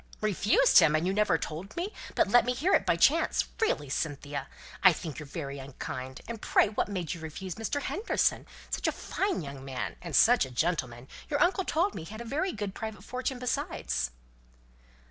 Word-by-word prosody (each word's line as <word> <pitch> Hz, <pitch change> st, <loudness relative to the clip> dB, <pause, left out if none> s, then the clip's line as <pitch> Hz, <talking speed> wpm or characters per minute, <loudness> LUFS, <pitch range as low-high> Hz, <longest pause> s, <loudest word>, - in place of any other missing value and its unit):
"Refused 215 Hz, -, +5 dB
him 160 Hz, -3 st, +5 dB
and 155 Hz, +2 st, +1 dB
you 190 Hz, -, +1 dB
never 200 Hz, -5 st, +3 dB
told 165 Hz, -, -6 dB
me, 370 Hz, +5 st, -2 dB, 0.2 s
but -, -, +3 dB
let 240 Hz, +4 st, +6 dB
me 250 Hz, 0 st, -1 dB
hear 340 Hz, +10 st, +1 dB
it -, -, +3 dB
by -, -, +4 dB
chance! -, -, +3 dB
Really, 295 Hz, -, +1 dB
Cynthia, 145 Hz, -1 st, -3 dB, 0.3 s
I 185 Hz, -2 st, +8 dB
think 155 Hz, -1 st, -6 dB
you're 150 Hz, -, -8 dB
very 140 Hz, -2 st, -5 dB
unkind. 130 Hz, -1 st, -6 dB
And 230 Hz, -1 st, -6 dB
pray -, -, +3 dB
what 210 Hz, -, -1 dB
made 185 Hz, -6 st, -3 dB
you 170 Hz, -, -9 dB
refuse 170 Hz, +4 st, -6 dB
Mr. 225 Hz, -, -3 dB
Henderson? 415 Hz, +6 st, 0 dB, 0.2 s
Such -, -, -1 dB
a -, -, +3 dB
fine 390 Hz, -, -2 dB
young 140 Hz, -2 st, -8 dB
man, 135 Hz, -2 st, -4 dB
and 170 Hz, -5 st, -4 dB
such 245 Hz, +2 st, +6 dB
a 130 Hz, -, -4 dB
gentleman! 130 Hz, -4 st, -1 dB, 0.2 s
Your 285 Hz, -, 0 dB
uncle 365 Hz, +1 st, +3 dB
told 360 Hz, +6 st, +1 dB
me -, -, -6 dB
he -, -, -10 dB
had 220 Hz, +1 st, -8 dB
a -, -, -7 dB
very 310 Hz, +10 st, -1 dB
good 205 Hz, -2 st, -4 dB
private 220 Hz, 0 st, -6 dB
fortune 255 Hz, +1 st, -3 dB
besides." 150 Hz, -, -2 dB
190 Hz, 200 wpm, -29 LUFS, -, 0.3 s, I